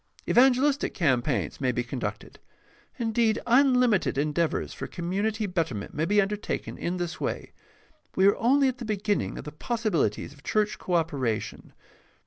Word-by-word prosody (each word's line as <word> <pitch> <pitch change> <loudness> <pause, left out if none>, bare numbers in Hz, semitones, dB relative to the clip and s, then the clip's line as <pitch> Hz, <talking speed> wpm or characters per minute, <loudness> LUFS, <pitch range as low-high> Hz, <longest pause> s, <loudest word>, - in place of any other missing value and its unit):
Evangelistic 270 +3 +3
campaigns 140 -4 0
may 130 -2 +2
be 120 0 -1
conducted. 120 +1 -6 0.6
Indeed, 225 -2 +1
unlimited 250 - +3
endeavors 150 +3 0
for - - -6
com 175 0 -5
munity 215 +3 0
betterment 165 - -3
may 155 - 0
be 205 +4 +3
undertaken 205 +1 -2
in 175 +2 -3
this 175 -1 -4
way. - - -3 0.6
We 190 - +4
are 200 - +6
only 270 +4 +3
at 255 -1 -2
the - - -5
beginning 210 -1 -1
of - - -6
the 150 - -6
possibilities 170 - -1
of 145 - -19
church 210 +7 0
co 180 - -1
operation. 140 -10 -2
195 Hz, 150 wpm, -27 LUFS, 150-230 Hz, 0.6 s, are